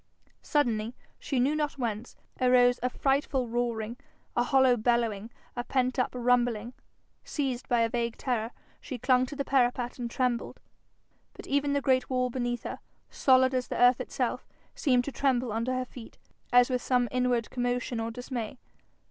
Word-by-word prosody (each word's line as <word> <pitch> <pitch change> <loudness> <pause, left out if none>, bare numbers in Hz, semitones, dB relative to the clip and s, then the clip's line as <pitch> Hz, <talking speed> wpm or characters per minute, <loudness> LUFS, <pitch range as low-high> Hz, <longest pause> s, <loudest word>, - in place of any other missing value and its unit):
Suddenly, 235 -5 0 0.2
she 270 - -2
knew 275 +5 +2
not 300 -2 -1
whence, 230 -2 -4 0.3
arose 250 -1 +5
a 250 - +1
frightful 270 -1 0
roaring, 235 -1 -2 0.4
a 240 - +3
hollow 260 0 +4
bellowing, 230 -2 0 0.3
a 245 - -2
pent 255 +1 0
up 250 - +2
rumbling. 245 -2 +1 0.5
Seized 265 -4 -3
by 240 -2 +3
a 230 - +2
vague 235 -1 -2
terror, 230 -4 -1 0.3
she 260 - -6
clung 255 +1 +3
to 290 - -7
the 280 -1 -3
parapet 245 -2 +1
and 240 -1 -3
trembled. 245 -1 -1 0.7
But - - -11
even 280 0 +1
the 285 - +1
great 255 -1 +2
wall 255 -1 0
beneath 240 -1 -2
her, - - -5 0.3
solid 260 -1 +4
as 255 -1 -1
the - - -4
earth 245 0 +5
itself, - - -3 0.3
seemed 250 -4 +2
to 280 - -4
tremble 255 -2 0
under 230 +4 -1
her 255 0 -1
feet, 245 -2 -12 0.3
as 245 +1 +5
with 250 -1 0
some 245 -1 +2
inward 250 -2 0
commotion 245 -1 -1
or 225 0 -2
dismay. 245 0 -5
245 Hz, 165 wpm, -28 LUFS, 240-255 Hz, 0.7 s, arose